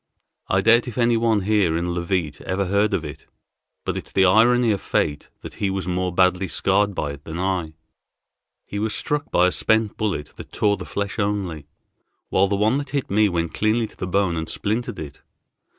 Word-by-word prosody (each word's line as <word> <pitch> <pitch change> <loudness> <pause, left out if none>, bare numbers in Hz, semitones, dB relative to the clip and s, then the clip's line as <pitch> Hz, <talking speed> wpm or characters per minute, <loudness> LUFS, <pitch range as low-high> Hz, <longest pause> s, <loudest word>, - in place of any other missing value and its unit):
I 95 - +2
doubt 115 +4 +4
if 120 - -7
any 120 -1 +3
one 115 -2 +2
here 95 -5 +2
in 85 +1 -2
Leauvite 85 -4 -2
ever 95 +1 -1
heard 100 +3 +2
of 85 -5 -1
it, 75 - -9 0.6
but - - -2
it's - - -6
the 95 - +4
irony 115 +5 +4
of 100 - -1
fate 75 0 -1
that - - -9
he 100 - +2
was 95 -2 -3
more 90 0 -1
badly 90 +1 +2
scarred 100 +2 +1
by 75 -4 -2
it 70 0 -10
than 80 +1 -6
I. 90 -4 -2 0.9
He 100 - -5
was 110 +1 -1
struck 150 -1 -2
by 90 - +3
a 90 - +3
spent 110 +1 +1
bullet 100 -9 -2
that - - -10
tore 105 -1 +1
the - - -7
flesh 100 +2 -4
only, 95 -8 -2 0.6
while 95 +1 +3
the 100 - 0
one 110 +7 +2
that 145 - -6
hit 140 -7 -3
me 105 +1 +4
went 85 -2 -2
cleanly 110 +2 +1
to - - -13
the 95 - -5
bone, 95 -2 +1
and 80 -1 -4
splintered 115 +1 -2
it. 70 -3 -8
100 Hz, 205 wpm, -22 LUFS, 90-110 Hz, 0.9 s, doubt